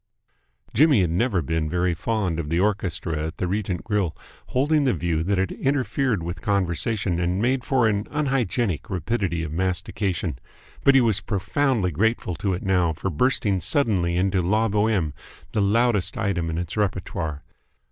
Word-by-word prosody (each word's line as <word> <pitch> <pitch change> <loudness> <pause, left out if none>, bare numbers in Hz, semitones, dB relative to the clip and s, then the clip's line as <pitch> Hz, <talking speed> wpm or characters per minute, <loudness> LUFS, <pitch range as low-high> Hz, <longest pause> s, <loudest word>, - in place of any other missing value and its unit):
Jimmy 140 -3 +5
had 85 -3 +1
never 95 -1 +1
been 80 +1 -1
very 90 +1 +1
fond 95 -2 -1
of 75 -3 -4
the 85 +2 +1
orchestra 90 -6 -1
at 80 - -8
the 90 - -1
Regent 95 -2 -2
Grill, 100 -7 -1 0.3
holding 145 +3 +2
the 130 -7 +2
view 85 -1 -1
that 95 +4 0
it 95 0 0
interfered 135 - 0
with 85 0 -5
conversation 95 -1 0
and 90 +2 0
made 125 +3 +1
for 130 -5 +2
an 105 -1 0
unhygienic 120 - -1
rapidity 90 -2 -1
of 75 - -4
mastication; 90 - -2 0.4
but 140 - +6
he 135 - +7
was 110 -4 +2
profoundly 105 +1 0
grateful 105 +3 0
to 95 -3 0
it 90 - -6
now 90 -4 +2
for 95 +5 -3
bursting 100 - +1
suddenly 90 - +1
into 95 0 +2
La 105 +6 +2
Boheme, 105 -7 +1 0.4
the 110 - 0
loudest 110 +1 +2
item 95 -6 -1
in 80 - -2
its 90 0 -4
repertory. 95 -6 -2
95 Hz, 165 wpm, -24 LUFS, 85-115 Hz, 0.4 s, he